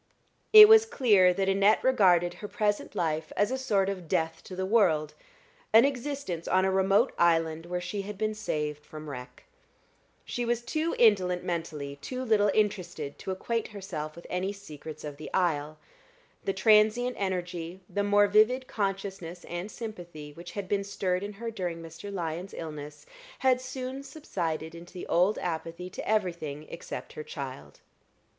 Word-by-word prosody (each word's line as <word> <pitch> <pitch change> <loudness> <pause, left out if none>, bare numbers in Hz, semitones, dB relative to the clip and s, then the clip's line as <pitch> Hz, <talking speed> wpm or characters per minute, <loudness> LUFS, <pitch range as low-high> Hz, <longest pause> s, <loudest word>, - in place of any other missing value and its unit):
It 430 -1 +12
was 445 0 +7
clear 210 - +5
that 190 +1 -1
Annette 195 +2 +4
regarded 180 -9 +4
her 205 - -8
present 210 -2 -1
life 160 -1 -1
as 205 +3 +2
a - - +1
sort 200 -7 +1
of 185 -4 -4
death 160 +1 -1
to 185 - -8
the 190 +1 -2
world 165 -8 +3 0.6
an 225 +3 +8
existence 275 - -3
on 185 0 +3
a 190 - +2
remote 195 +5 +3
island 165 -1 +2
where 180 0 -2
she 180 +3 -4
had 205 0 -7
been 215 +1 0
saved 150 -8 -3
from 155 0 -10
wreck. 125 -2 -9 0.8
She 245 - -3
was 240 0 0
too 310 +6 -1
indolent 185 -6 +4
mentally, 150 -5 -4
too 255 - -5
little 215 -4 +3
interested, 180 -9 -1
to - - -7
acquaint 225 +4 -2
herself 175 -7 -6
with 170 - -12
any 185 +2 -2
secrets 155 -6 -10
of 145 -2 -6
the 155 - -8
isle. 155 -4 0 0.7
The - - +1
transient 215 +5 +4
energy, 180 -2 -3
the 205 - -1
more 205 0 +4
vivid 215 +6 +4
consciousness 195 -5 -4
and 175 +4 -5
sympathy 175 -11 -8
which 175 +2 -10
had 200 -2 -4
been 200 +1 0
stirred 185 -2 -1
in 205 +1 -5
her 230 +3 -5
during 180 -6 -4
Mr. 165 +4 -9
Lyon's 175 0 -4
illness, 150 - -7 0.3
had 255 -1 +3
soon 255 +1 -5
subsided 170 - -4
into 170 +1 -12
the 180 - -6
old 180 +5 +2
apathy 170 +1 -4
to - - -7
everything 170 -8 -1
except - - -7
her 460 - -6
child. 465 +2 -8
190 Hz, 165 wpm, -28 LUFS, 165-215 Hz, 0.8 s, It